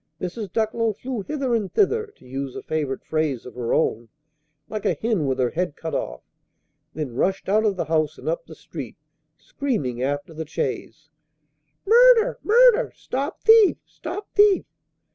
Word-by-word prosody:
Mrs. 190 +2 -5
Ducklow 220 +1 0
flew 245 +2 -5
hither 270 +2 -2
and 210 -5 0
thither 440 +2 +2
(to - - -21
use 135 +1 -5
a - - -6
favorite 150 -4 -3
phrase 155 -6 -1
of 125 - -9
her 120 -2 -3
own), 115 +1 0 0.6
"like 215 -2 -5
a - - +1
hen 215 -10 0
with 130 -1 0
her 125 -2 +1
head 175 -3 -2
cut 160 -2 -6
off;" - - -3 0.7
then 150 -5 -4
rushed 190 +10 -1
out 215 +3 +3
of 205 -2 +2
the 180 - -2
house 155 0 0
and - - -10
up - - -2
the - - -11
street, - - -9 0.4
screaming 145 - -3
after 145 +4 -2
the 160 0 -6
chaise, 150 +2 -4 0.7
"Murder! 480 +2 +6
murder! 480 +1 +5
Stop 275 +5 -4
thief! 445 -3 +6
stop 410 - -7
thief!" 410 -2 +5
190 Hz, 165 wpm, -23 LUFS, -, 0.7 s, Murder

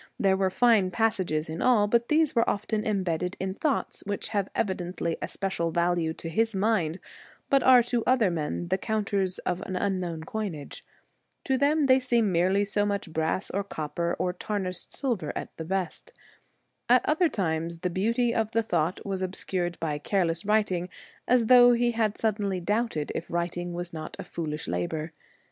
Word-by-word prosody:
There 195 -1 +3
were 190 0 +1
fine 215 -2 +4
passages 185 -7 0
in 160 +1 -5
all, 235 -5 +4
but 235 +3 +2
these 310 -1 +3
were 230 - +3
often 215 +1 -1
em 205 -3 0
bedded 180 +1 -2
in 190 0 -2
thoughts 280 +7 -1
which 205 -1 -3
have 200 -3 -1
evidently 180 -4 -2
a - - -2
special 190 -4 -2
value 170 -1 +1
to - - -8
his 225 +6 0
mind, 190 -5 +1 0.5
but 275 -1 +5
are 250 -1 +7
to 240 -1 -1
other 245 -7 +3
men 170 +1 -3
the 190 +1 +1
counters 200 -4 -1
of 180 - -1
an 190 -2 -5
unknown 180 -4 -2
coinage. 170 -6 -5 0.6
To 265 - +1
them 290 +3 +2
they 260 -1 +5
seem 235 -5 +1
merely 185 +4 +2
so 205 0 +1
much 200 -5 -2
brass 160 +4 -1
or 200 +2 -1
copper 170 -2 -3
or 180 - -1
tarnished 185 -1 -3
silver 225 - -2
at - - -6
the 160 - -5
best. 190 - -3 0.8
At 250 0 +5
other 320 +3 +3
times 165 - -2
the 180 - -1
beauty 230 +6 +1
of 225 0 -1
the 230 - +2
thought 170 -4 -1
was 195 -2 -3
obscured 180 -1 -3
by 150 -3 -2
careless 170 0 0
writing 200 -4 +1 0.4
as 245 -2 +4
though 245 +1 +8
he 240 0 +2
had 220 -2 0
suddenly 205 -4 0
doubted 205 -4 -1
if 165 - -5
writing 175 +1 -2
was 175 0 -5
not 155 -1 -6
a - - -6
foolish 155 -2 -5
labour. 120 - -2
190 Hz, 180 wpm, -27 LUFS, 170-225 Hz, 0.8 s, though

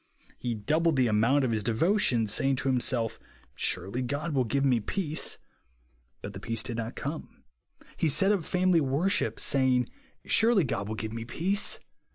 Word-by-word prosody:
He 120 -2 -2
doubled 155 +10 +1
the 130 -1 +3
amount 115 +6 +3
of 120 - 0
his 110 -2 0
devotions, 120 - +2
saying 135 +3 +2
to 135 +1 -1
himsolf. 120 -3 0 0.3
Surely 95 +8 -2
God 145 +6 -3
will 130 -3 +2
give 140 +5 0
me 125 -3 +3
peace. 155 - -2 0.9
But - - -6
the - - -7
peace 115 -1 -2
did 120 -2 -3
not 115 +2 -4
come. 150 +3 -6 0.5
He 160 - +2
set 180 +8 +3
up 200 -5 +1
family 180 0 +2
worship, 160 +9 0
saying, 130 -2 +2 0.4
Surely 225 -4 +4
God 105 -7 -2
will 110 - -3
give 110 0 -5
me 115 0 -4
peace. 175 - 0
130 Hz, 170 wpm, -28 LUFS, 115-165 Hz, 0.9 s, Surely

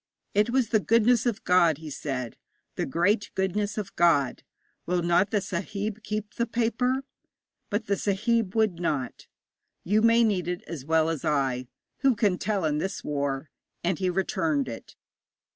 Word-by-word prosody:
'It 210 +3 +3
was 250 -2 +1
the 220 - +3
goodness 230 +3 +3
of 225 -3 -1
God,' 170 -4 +4
he 155 -1 -8
said 130 -4 -4 0.4
'the - - -2
great 205 - +1
goodness 200 +2 -1
of 205 -2 -5
God. 165 -6 +3 0.5
Will 175 0 +1
not 175 +3 +3
the 205 -1 +1
sahib 200 +4 -4
keep 215 0 -4
the 235 - -1
paper?' 240 +3 0 0.7
But 210 +1 -1
the 200 - +1
sahib 215 +1 0
would 215 -6 +2
not. 145 -8 -2 0.6
'You 210 +4 +2
may 230 +1 +5
need 195 -6 +1
it 180 0 -3
as 150 -6 -7
well 160 0 +3
as 165 -3 -2
I. 130 -4 0 0.3
Who 270 -2 +3
can 205 -4 +1
tell 200 -4 -1
in 150 -1 +1
this 190 +4 -3
war?' 140 -1 -2 0.3
And 175 -1 0
he 185 -1 +1
returned 165 -6 0
it. 115 -2 -8
190 Hz, 165 wpm, -27 LUFS, 160-215 Hz, 0.7 s, may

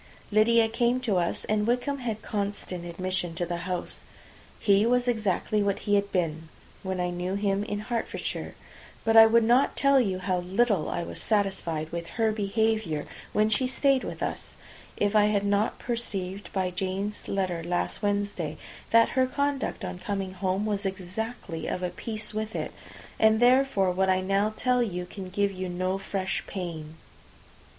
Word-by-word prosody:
Lydia 225 +2 +5
came 240 +2 +1
to 215 -7 +1
us, 170 -1 -1
and 210 0 +1
Wickham 250 +4 0
had 225 -4 -4
constant 200 -4 -3
admission 175 0 -2
to 175 - -1
the 175 0 -3
house. 180 -1 -3 0.6
He 200 0 +4
was 245 +2 +2
exactly 215 -2 +1
what 200 -1 +1
he 205 - +1
had 200 0 +2
been 160 -3 -1 0.3
when 190 -1 -3
I 180 0 0
knew 180 +2 -2
him 200 0 0
in 205 -1 -3
Hertfordshire; 235 +1 -4 0.5
but 225 0 +3
I 225 0 +10
would 230 +1 +4
not 245 +5 +3
tell 275 -1 +5
you 195 -6 0
how 185 -1 -1
little 195 0 +1
I 170 - -2
was - - -5
satisfied 190 -7 0
with 170 0 -4
her 225 -1 +3
behaviour 215 -6 0 0.3
while 215 0 +3
she 255 +4 +2
stayed 270 0 +2
with - - -5
us, - - -4 0.4
if 205 +1 +1
I 210 -1 +6
had 205 -1 +1
not 200 +1 +1
perceived, 200 -5 -3
by 185 -2 -1
Jane's 190 +3 -3
letter 185 -4 -1
last 175 +1 -1
Wednesday, 205 0 -1 0.3
that 230 0 +5
her 260 0 +2
conduct 280 +1 -1
on 180 - -5
coming 195 -2 -3
home 190 +2 -1
was 205 -1 -1
exactly 190 -2 -4
of 185 - -3
a 180 - -1
piece 215 +1 -4
with 215 +1 -3
it, - - -3 0.5
and 220 0 +5
therefore 245 -6 +4
what 190 +1 +1
I 185 0 +3
now 195 +3 +1
tell 250 -1 +2
you 180 -6 -2
can 185 +1 -8
give 200 +1 +1
you 185 -1 -4
no 185 +2 -1
fresh 195 -1 -2
pain. 165 -5 -6
200 Hz, 175 wpm, -27 LUFS, 185-225 Hz, 0.6 s, I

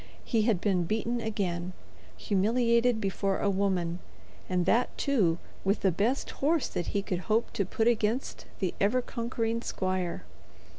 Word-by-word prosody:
He 225 - +2
had 205 -6 +2
been 180 -3 +1
beaten 225 +5 -1
again, 185 -5 -2 0.4
humiliated 235 - +2
before 195 -1 0
a 200 - +2
woman, 185 -3 0 0.5
and 180 -1 +1
that, 240 +2 +2
too, 205 - +2 0.3
with 195 +2 +1
the 190 - +3
best 220 - 0
horse 305 +2 +1
that 175 - -3
he 200 - -1
could 180 -3 -2
hope 225 +2 +1
to 200 - 0
put 220 +4 0
against 235 +2 0
the 185 -3 -1
ever 240 +6 +3
conquering 230 -1 -2
squire. 185 -5 -2
205 Hz, 150 wpm, -29 LUFS, 185-235 Hz, 0.5 s, the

